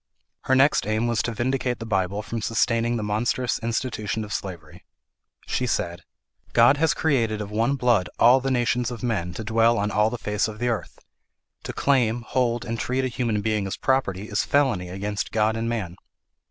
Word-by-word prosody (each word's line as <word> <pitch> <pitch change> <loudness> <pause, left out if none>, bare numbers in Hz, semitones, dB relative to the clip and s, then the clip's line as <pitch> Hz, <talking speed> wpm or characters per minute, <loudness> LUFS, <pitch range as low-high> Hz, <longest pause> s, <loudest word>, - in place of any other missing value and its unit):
Her 130 - +3
next 135 -5 +3
aim 110 +2 0
was 120 -2 +1
to 115 - -3
vindicate 125 +2 -1
the 115 - -7
Bible 100 -1 -1
from 115 +1 -4
sustaining 115 +1 +1
the 110 - -3
monstrous 120 +4 0
institution 110 -2 -2
of 105 -1 -6
slavery. 85 -7 -7 0.6
She 125 - -1
said, 85 -6 -2 0.5
"God 120 +4 +6
has 160 0 +2
created 115 -9 +1
of 105 -1 -5
one 115 +6 +1
blood 120 -8 +2
all 125 +3 +6
the 135 - -1
nations 120 -1 +1
of 120 -2 -7
men, 100 -8 -1
to 110 - -5
dwell 115 +2 +3
on 105 0 0
all 105 +1 +3
the 120 - -4
face 105 -1 -1
of 110 -1 -7
the 120 +2 -1
earth. 115 - -3 0.7
To - - -3
claim, 120 -4 +1
hold, 120 -1 0
and 115 -1 -3
treat 130 +3 -1
a - - -1
human 115 -4 -1
being 105 -2 0
as 95 - -4
property 105 -7 0
is 105 0 0
felony 125 -11 +1
against 100 +3 -4
God 110 0 +1
and 115 +1 -2
man. 95 -7 -3
115 Hz, 195 wpm, -24 LUFS, 105-125 Hz, 0.7 s, God